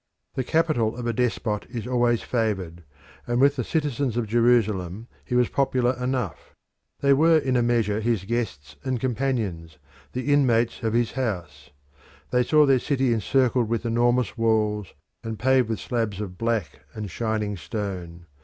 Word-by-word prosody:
The 130 - -1
capital 125 -7 +1
of 120 - -5
a 120 - 0
despot 110 -3 -1
is 115 -2 -5
always 120 -2 +1
favoured, 95 -8 -2 0.4
and 120 0 0
with 140 +2 +5
the 125 - -2
citizens 140 -4 -1
of 120 - 0
Jerusalem 110 -4 +1 0.2
he 125 - -3
was 125 -1 +4
popular 130 -2 +1
enough. 125 - -3 0.5
They 140 0 +5
were 160 +3 +5
in 135 -4 0
a 120 - +3
measure 115 -3 +1
his 110 -3 0
guests 75 - -3
and 130 -2 -1
companions, 110 -11 -2 0.4
the 130 +3 0
inmates 120 -6 +2
of 110 -2 -1
his 120 -1 +1
house. 85 - -4 0.6
They 125 - +3
saw 150 +4 +4
their 135 -2 +4
city 135 -3 +1
encircled 120 +1 +1
with 115 +1 -1
enormous 120 +1 +1
walls, 105 -3 +1 0.3
and 110 -1 -4
paved 130 -1 +3
with 110 - -2
slabs 115 -5 -2
of 100 -4 -5
black 115 -4 -2 0.2
and 105 -3 -5
shining 110 -1 -2
stone. 90 -1 -5
115 Hz, 160 wpm, -25 LUFS, 105-125 Hz, 0.6 s, with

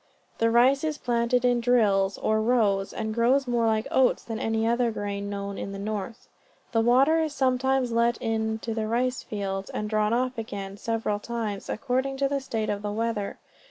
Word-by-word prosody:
The 230 - +3
rice 255 +5 +4
is 310 -1 -1
planted 240 -1 +1
in 245 -1 +3
drills, 205 -5 +2
or 220 0 +1
rows, 215 -4 +2
and 220 -1 -3
grows 250 +4 +3
more 235 -2 +1
like 220 0 +1
oats 260 -1 +3
than 225 -1 -5
any 225 0 0
of 235 +1 +1
the 245 - +3
other 230 - +1
grain 200 -1 -4
known 200 0 -4
in 195 - -5
the - - -5
north. 215 +3 -5 0.4
The 225 - +2
water 265 +7 +4
is 310 -2 -2
sometimes 265 -1 +1
let 235 0 +2
in 220 -1 -1
to 230 - -2
the 220 -1 -2
rice 250 +3 0
fields, 195 -2 -4
and 210 - -3
drawn 215 0 +1
off 250 +1 0
again, 200 -3 -6
several 220 -1 -2
times, 220 -3 -4
according 265 +3 -1
to 275 0 +2
the 275 0 -1
state 225 -5 -2
of 200 -1 -3
the 205 0 -3
weather. 220 -1 -2
230 Hz, 200 wpm, -26 LUFS, 210-250 Hz, 0.4 s, rice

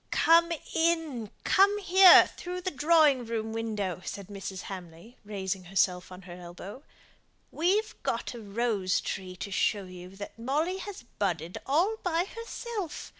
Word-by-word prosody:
"Come 335 +1 +4 0.2
in 320 -9 0
come 400 +2 +4
here 380 -2 +8
through 360 +1 -6
the 370 - -2
drawing 295 -2 +4
room 225 -1 -4
window," 210 -5 -3
said 200 -1 -7
Mrs. 195 -2 -6
Hamley, 180 +4 -10
raising 190 -2 -4
herself 180 0 0
on 185 +1 -11
her 180 -1 -10
elbow. 180 +6 -10 0.7
"We've 390 +7 +1
got - - -2
a 240 - -8
rose 205 -3 0
tree 185 -2 -5
to 200 +2 -7
show 200 +1 +1
you 180 -1 -10
that 205 +3 -9
Molly 300 +10 -1
has 395 -7 -8 0.2
budded 175 -4 -2
all 350 +11 +2
by 345 0 0
herself. 460 -4 -6
225 Hz, 145 wpm, -28 LUFS, -, 0.7 s, here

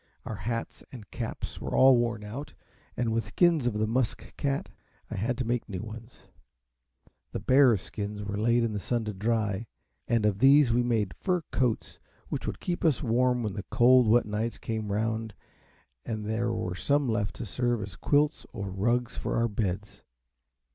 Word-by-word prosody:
Our - - -5
hats 115 +3 -4
and 110 -8 -11
caps - - -5
were - - -3
all 130 0 +7
worn 120 -3 0
out, 135 +8 -7 0.4
and 115 -2 0
with 115 0 -1
skins 170 -7 +3
of 120 - 0
the 105 +1 +1
musk 115 +1 -2
cat 140 -1 -2 0.4
I - - -3
had 120 +5 -1
to 130 - -2
make 120 0 -1
new 95 -1 -4
ones. 115 +2 -10 1.1
The - - -2
bears' 130 -7 +4
skins 105 0 -5
were 100 0 -4
laid 120 +2 +3
in 115 -2 -1
the 105 - -2
sun 115 +2 -1
to 105 - -3
dry, 110 +1 -1 0.4
and 115 -3 +2
of 100 -2 +1
these 135 -1 +6
we 120 - +3
made 115 -6 0
fur 180 -3 -1
coats, 125 -4 -1 0.3
which - - -3
would - - -3
keep 175 -1 -3
us 155 -3 +2
warm 125 0 +2
when 105 -3 -2
the 100 - -4
cold 125 -1 +5
wet 120 +3 +5
nights 105 +2 -2
came 110 -2 -4
round, 110 0 -1 0.7
and 110 -2 -4
there 115 +2 0
were 110 -5 -2
some 140 +9 +1
left 105 -3 -1
to - - -5
serve 120 +1 -1
as 100 -2 -8
quilts 150 +1 +1
or 100 -2 -4
rugs 120 +6 0
for - - -2
our 115 0 +2
beds. 105 -2 -3
115 Hz, 185 wpm, -28 LUFS, 105-125 Hz, 1.1 s, all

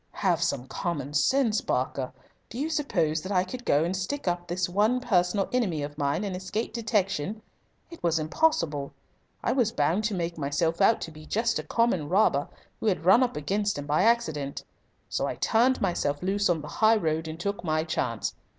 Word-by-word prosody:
"Have - - +1
some 125 - 0
common 145 -1 -3
sense, 220 - +2
Barker. 130 0 -1 0.4
Do 230 - -8
you 300 +5 -1
suppose 165 - 0
that 185 - -6
I 180 -2 +3
could 245 +7 -7
go 150 -8 +3
and 175 +3 -1
stick 190 +8 -3
up 175 0 -1
this 175 +1 -1
one 210 +7 +2
personal 195 -4 +1
enemy 190 -12 0
of 145 0 -6
mine 145 +5 0
and 195 -3 -3
escape 190 +5 -3
detection? 215 -4 -1 0.5
It 335 - -11
was 170 -1 +2
impossible. 155 - 0 0.5
I - - +1
was 240 -5 +2
bound 165 +7 +1
to 215 -3 0
make 170 -2 -3
myself 160 +5 0
out 220 +3 +4
to 165 - -5
be 155 0 -13
just 230 +2 0
a - - -4
common 210 -11 +1
robber 175 -7 +3 0.3
who - - -2
had 180 -5 0
run 195 +7 +7
up 250 -8 0
against 200 +6 -1
him 145 - -5
by 150 +1 +2
accident. 160 -12 +1 0.4
So - - -1
I - - -3
turned 245 +3 +2
myself 160 -5 -1
loose 200 +1 +1
on 165 -3 +1
the 150 - -8
high 220 +7 +3
road 160 -4 -1
and 160 +1 -6
took 200 +2 -3
my 155 -2 +1
chance. 160 - -2
180 Hz, 195 wpm, -27 LUFS, 155-220 Hz, 0.5 s, run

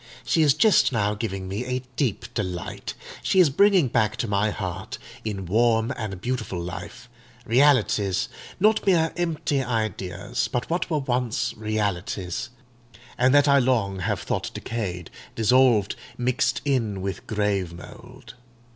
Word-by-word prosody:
She 165 - +2
is 145 -3 +5
just 215 -10 +4
now 105 -4 +1
giving 95 -3 -4
me 100 +5 -3
a 125 0 -3
deep 120 -4 -1
delight: 90 -5 -4 0.3
she 190 - +2
is 170 -6 +6
bringing 195 -1 +4
back 110 -3 +1
to 120 - -2
my 100 +1 +1
heart, 95 -5 -5 0.3
in 100 -3 -4
warm 115 +4 +2
and 105 -5 -5
beautiful 115 -5 -3
life, 90 +7 -7 0.4
realities—not 130 - +2
mere 165 -4 +3
empty 155 -5 -1
ideas, 110 -2 -2
but 125 -1 -2
what 175 +1 -1
were 155 - +1
once 125 -4 -1
realities, 105 0 -2 0.7
and 130 +1 +3
that 145 0 +5
I 140 0 +6
long 115 -7 +1
have 90 - -1
thought - - -2
decayed, 90 -7 -4 0.2
dissolved, 115 -2 +4 0.2
mixed 125 +1 0
in 115 -9 0
with 95 -1 -5
grave 105 -4 0
mould. 120 +8 -12
115 Hz, 140 wpm, -24 LUFS, 100-130 Hz, 0.7 s, is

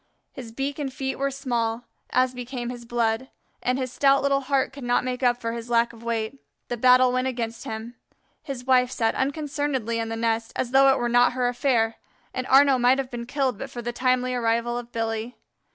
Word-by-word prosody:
His 245 -4 -9
beak 275 +5 -3
and 275 -2 -3
feet 265 0 -4
were 275 0 +1
small, 240 -4 -2 0.3
as 255 0 +2
became 245 -1 -5
his 240 -1 -9
blood, 235 +1 0 0.3
and 250 +1 0
his 255 -2 -3
stout 275 -1 +3
little 275 0 +3
heart 270 0 0
could 275 -1 -9
not 245 +1 +2
make 250 0 -3
up 245 -1 +2
for 230 -1 -3
his 235 0 -6
lack 235 0 +2
of 230 - -14
weight. 230 +2 -3 0.3
The 240 - -1
battle 255 +1 +5
went 255 +1 0
against 235 -3 -4
him. 220 +2 -6 0.5
His 265 -4 -7
wife 250 -1 +4
sat 230 -3 0
unconcernedly 275 -4 -1
in 225 0 -2
the 225 - -3
nest, 225 0 -1
as 245 - -2
though 270 +1 +6
it - - +2
were 240 - 0
not 245 +1 +4
her 250 -1 0
affair, 240 -3 +1 0.4
and 255 0 -3
Arnaux 270 -1 +6
might 250 +2 +5
have 270 -2 -3
been 235 -1 -6
killed 265 -5 -1
but - - -5
for 240 - -7
the 240 +1 -3
timely 255 0 +1
arrival 235 0 0
of 240 0 -6
Billy. 225 +1 -3
250 Hz, 215 wpm, -25 LUFS, 235-265 Hz, 0.5 s, though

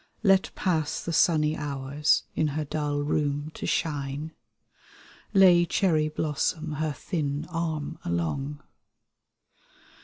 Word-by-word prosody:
Let 195 -2 +4
pass 160 -5 -1
the 170 - -3
sunny 155 -2 +3
hours 145 0 0
In 155 - +1
her 155 - -1
dull 145 0 -1
room 145 0 -1
to - - -5
shine, 145 0 -2 1.0
Lay 185 -4 +6
cherry 165 -4 +2
blossom 155 +1 -1
her 155 -1 0
thin 145 0 -3
arm 160 -3 -3
along. 135 - -2
150 Hz, 110 wpm, -27 LUFS, 145-160 Hz, 1.0 s, Lay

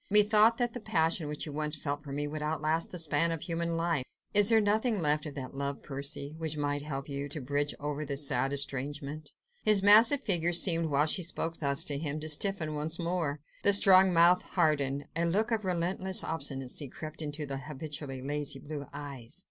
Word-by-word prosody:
"Methought 210 +2 +5
that 240 -2 -1
the 245 - -6
passion 165 -5 0
which 150 0 -4
you 150 - -8
once 150 +1 -1
felt 145 -1 -4
for 140 - -9
me 145 +1 -3
would 150 +1 -6
outlast 155 +1 -1
the 180 - -6
span 165 0 +2
of 165 -2 -3
human 170 -1 -2
life. 165 -5 0 0.3
Is 205 0 +6
there 225 -1 +5
nothing 215 +1 +1
left 150 -1 +2
of 145 - -9
that 130 -3 -7
love, 140 0 -4
Percy... 140 +1 -3
which 160 -2 -4
might 145 0 -2
help 140 -1 -6
you... 140 0 -5
to 150 - -2
bridge 145 +2 -2
over 145 +1 -4
that 140 -1 -4
sad 135 -2 +1
estrangement?" 140 +2 -3 0.3
His 210 -2 +3
massive 225 +7 +7
figure 175 -4 +2
seemed, 165 -1 +4
while 145 +1 +2
she 170 +4 0
spoke 165 -1 -4
thus 140 -2 +1
to 145 -1 -2
him, 150 -1 -3
to 155 - -4
stiffen 155 -3 0
still 165 +1 -2
more, 165 -5 -2 0.2
the 200 - +6
strong 190 -1 +7
mouth 175 +1 +5
hardened, 145 -5 0
a 165 - +2
look 210 +7 0
of 220 -2 0
relentless 185 +1 -1
obstinacy 135 -3 -4
crept 155 +4 -8
into 150 0 -4
the 135 -1 -5
habitually 140 -1 -7
lazy 145 0 -3
blue 145 0 -8
eyes. 140 -1 -6
155 Hz, 200 wpm, -29 LUFS, 145-175 Hz, 0.3 s, massive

